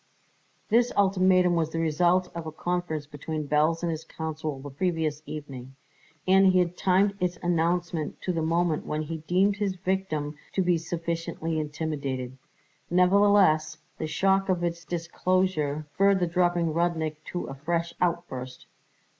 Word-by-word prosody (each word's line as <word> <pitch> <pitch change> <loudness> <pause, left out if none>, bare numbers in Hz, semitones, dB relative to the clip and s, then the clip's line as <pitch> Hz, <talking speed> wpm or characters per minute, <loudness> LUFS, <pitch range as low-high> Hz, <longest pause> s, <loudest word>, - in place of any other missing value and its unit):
This 235 +2 +3
ultimatum 185 -2 +4
was 160 -2 +1
the 165 - -5
result 175 +3 +2
of 170 -1 -6
a - - -4
conference 170 -2 -2
between 150 +1 -5
Belz 155 +3 +2
and 170 - 0
his 160 0 -4
counsel 155 -2 -5
the 140 +1 -8
previous 155 -1 -1
evening, 135 -4 -8 0.5
and 190 +1 +6
he 185 0 +4
had 180 -1 +1
timed 195 +2 +3
its 180 -1 -1
announcement 170 -2 0
to 185 - -1
the 165 - -1
moment 165 0 +1
when 155 +1 -2
he 160 +2 -5
deemed 185 +6 +1
his 200 -2 -1
victim 175 -6 -2 0.2
to 190 - +1
be 175 -2 +2
sufficiently 165 -1 -3
intimidated. 145 -4 -3 0.5
Nevertheless, 180 -4 +4 0.2
the 155 - -2
shock 195 +4 +1
of 180 -2 +1
its 170 0 -3
disclosure 170 -3 -1
spurred 195 +3 +4
the 180 - +2
drooping 175 -1 +1
Rudnik 160 -2 0
to 175 - -4
a - - -7
fresh 170 +4 -2
outburst. 150 -8 -2
170 Hz, 150 wpm, -27 LUFS, 155-180 Hz, 0.5 s, and